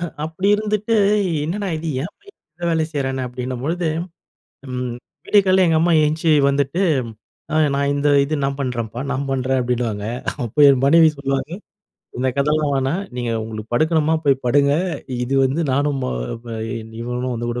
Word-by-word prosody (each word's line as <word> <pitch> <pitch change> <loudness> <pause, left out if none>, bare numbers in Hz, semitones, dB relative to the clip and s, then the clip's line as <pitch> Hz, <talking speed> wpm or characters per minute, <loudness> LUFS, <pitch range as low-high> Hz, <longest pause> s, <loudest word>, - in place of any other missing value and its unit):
ஹ 175 - -2 0.2
அப்டி 175 +5 -2
இருந்துட்டு, 215 +1 -1 0.5
என்னடா 195 +5 -2
இது 160 +1 -4
ஏன் 170 - -6
பையன் 405 0 -19 0.2
எல்லா 170 +1 -4
வேலையும் 160 0 0
செய்றானே 135 -2 -1
அப்படின்னபொழுது, 130 +7 -3 0.8
ம் 125 -1 -3 0.3
விடிய 205 -1 +5
காலை 185 0 +4
எங்க 160 - +3
அம்மா 170 +1 +3
எந்திச்சி 160 +1 +1 0.2
வந்துட்டு, 140 +6 0 0.7
அ - - +1 0.2
நான் 140 0 +1
இந்த 145 +1 +1 0.2
இது 155 +2 -2
நான் 135 0 -1
பண்றேன்ப்பா, 120 -3 -3
நான் 140 +1 -2
பண்றேன் 130 0 0
அப்டீன்னுவாங்க. 120 -4 -2 0.4
அப்போ 115 +6 -5
என் 135 -2 +4
மனைவி 160 +2 +6
சொல்லுவாங்க 135 +1 -2 0.7
இந்த 130 +1 +1
கதெல்லாம் 150 +1 +1
வேணாம். 135 +8 0
நீங்க 120 -1 -2
உங்களுக்கு 110 +1 -7
படுக்கணுமா 160 +2 +2
போய் 135 -1 +2
படுங்க, 140 +3 +3 0.5
இது 135 +2 -2
வந்து 135 +5 0
நானும் 140 0 +1
ம - - -1 0.4
ப - - -16 0.3
இன் 110 0 -11
இவனும் 125 +1 -3
வந்து 120 +1 -3
கூட 120 +1 -3
140 Hz, 165 wpm, -20 LUFS, 125-160 Hz, 0.8 s, மனைவி